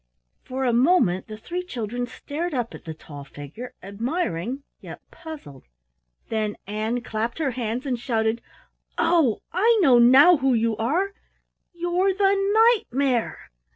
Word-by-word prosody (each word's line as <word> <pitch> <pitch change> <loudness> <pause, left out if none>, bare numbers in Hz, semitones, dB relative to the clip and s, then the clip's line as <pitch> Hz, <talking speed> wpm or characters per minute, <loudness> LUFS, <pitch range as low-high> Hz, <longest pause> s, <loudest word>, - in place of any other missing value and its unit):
For 260 +1 -3
a 245 - +2
moment 240 - +3
the 215 -1 -8
three 345 +11 -4
children 245 - -4
stared 310 +6 -5
up 240 -2 -2
at - - -11
the 160 - -5
tall 145 -2 -11
figure, 145 - -10
admiring 230 - -3 0.2
yet - - -10
puzzled, 290 - -11 0.6
then 215 -2 -1
Ann 215 +4 -2
clapped 225 0 -3
her 300 -5 0
hands 240 +1 -3
and 250 -3 -2
shouted: 225 -2 -1 0.6
"Oh, 305 -11 +2
I 445 +6 +4
know 250 -6 +6
now 270 +9 +7
who 265 -2 +2
you 225 -1 +1
are 335 - 0 0.6
you're 350 +2 0
the 395 0 +3
Knight 425 +3 +3
mare!" 255 -2 -1
250 Hz, 145 wpm, -24 LUFS, 220-340 Hz, 0.6 s, now